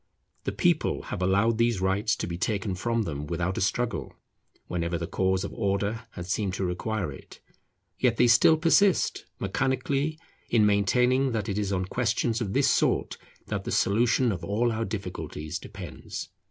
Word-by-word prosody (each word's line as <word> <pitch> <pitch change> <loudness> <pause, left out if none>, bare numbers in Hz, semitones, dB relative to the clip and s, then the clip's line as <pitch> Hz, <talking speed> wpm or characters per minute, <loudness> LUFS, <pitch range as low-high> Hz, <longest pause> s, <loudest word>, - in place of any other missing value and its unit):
The - - 0
people - - +1
have - - -5
allowed 100 +5 +2
these 115 -4 +2
rights 100 +4 +1
to - - -3
be 85 - -4
taken 100 +1 -1
from 115 +5 0
them 75 -5 -4
without 85 +3 -1
a - - -3
struggle 120 +5 -1 0.5
whenever 85 -1 -2
the 85 - -3
cause 95 +2 0
of - - -5
Order 105 +2 -1
has 90 0 -7
seemed 95 -1 -1
to 95 - -1
require 90 0 -2
it; 70 - -12 0.6
yet 120 -3 +2
they 125 - +5
still 120 +7 +6
persist, 175 +4 +3
mechanically, 135 +8 0 0.3
in 110 -3 +4
maintaining 125 +6 +3
that 110 -2 -2
it 100 -1 -1
is 100 -1 -1
on 95 -1 0
questions 115 +2 0
of 100 -4 -2
this - - +3
sort - - +1 0.3
that - - -3
the - - -4
solution 120 +3 +3
of 90 -3 -4
all 110 +6 +1
our 115 0 -1
difficulties 80 -7 -5
depends. - - -8
105 Hz, 170 wpm, -27 LUFS, 95-120 Hz, 0.6 s, still